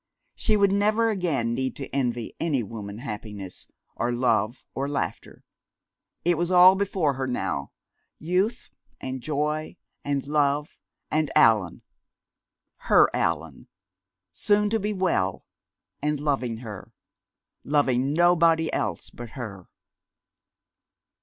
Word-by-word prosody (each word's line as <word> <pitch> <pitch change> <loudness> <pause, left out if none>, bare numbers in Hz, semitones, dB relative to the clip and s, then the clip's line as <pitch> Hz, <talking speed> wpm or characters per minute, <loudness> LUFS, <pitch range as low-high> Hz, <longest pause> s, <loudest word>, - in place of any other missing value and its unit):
She 215 -1 +1
would 200 -1 +4
never 215 +3 +2
again 155 - -1
need 130 +2 -2
to 135 - -6
envy 120 -4 -1
any 150 -7 0
woman 105 -1 -7
happiness 105 -5 -7 0.3
or 120 - -1
love 120 -1 0
or 140 +1 -2
laughter. 145 - -4 0.8
It 175 -2 +2
was 175 0 0
all 180 0 +8
before 190 -6 0
her 130 0 -3
now, 70 - -2 0.5
youth 185 +8 -1 0.3
and 130 0 -5
joy 150 +2 -2 0.3
and 140 -1 -1
love, 145 0 0 0.3
and 155 -1 +1
Allan, 105 -6 +4 0.9
her - - +4
Allan, 80 -3 -2 0.6
soon 205 - +1
to 225 - +2
be 210 +1 -1
well, 175 - 0 0.6
and 150 0 0
loving 135 -6 -1
her 105 -4 -8 0.7
loving 135 -2 +1
nobody 165 0 +3
else - - -2
but 120 -1 -9
her! 100 -7 -7
140 Hz, 115 wpm, -25 LUFS, 115-175 Hz, 0.9 s, all